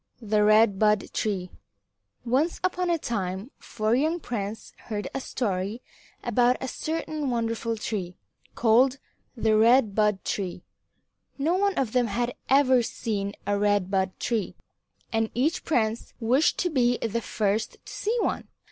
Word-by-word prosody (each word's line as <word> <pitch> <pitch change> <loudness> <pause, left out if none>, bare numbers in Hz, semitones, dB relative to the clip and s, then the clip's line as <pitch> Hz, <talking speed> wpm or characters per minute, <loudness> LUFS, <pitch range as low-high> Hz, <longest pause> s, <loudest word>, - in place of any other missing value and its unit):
IX 220 -4 -11
THE 210 -1 +4
RED 215 -1 +5
BUD 210 -1 +2
TREE 190 -4 -2 0.7
Once 275 +8 +1
upon 365 -1 0
a 340 - +2
time 200 - -3
four 215 0 -1
young 310 +7 +1
princes 220 -6 -5
heard 210 -2 -3
a 270 - -3
story 205 -1 -2 0.4
about 245 +1 +3
a 265 - -4
certain 310 0 -3
wonderful 230 -1 -1
tree, 185 -5 -4 0.4
called 250 +4 +4 0.4
the 220 -1 +2
Red 225 0 +5
Bud 210 -2 +1
Tree. 185 -3 -3 0.7
No 300 +5 +1
one 400 +1 +1
of 260 -8 0
them 245 -1 +2
had 240 +3 -1 0.2
ever 260 -2 +5
seen 205 -3 -3
a 205 0 0
Red 205 -2 +1
Bud 190 -1 0
Tree, 225 -5 -1 0.6
and 225 0 +1
each 285 +7 +1
prince 225 -6 -1
wished 255 +6 +2
to 355 - 0
be 245 -4 +2
the 230 +1 -2
first 215 +1 -1
to - - -9
see 445 +4 -1
one. - - -1
230 Hz, 150 wpm, -26 LUFS, 210-260 Hz, 0.7 s, RED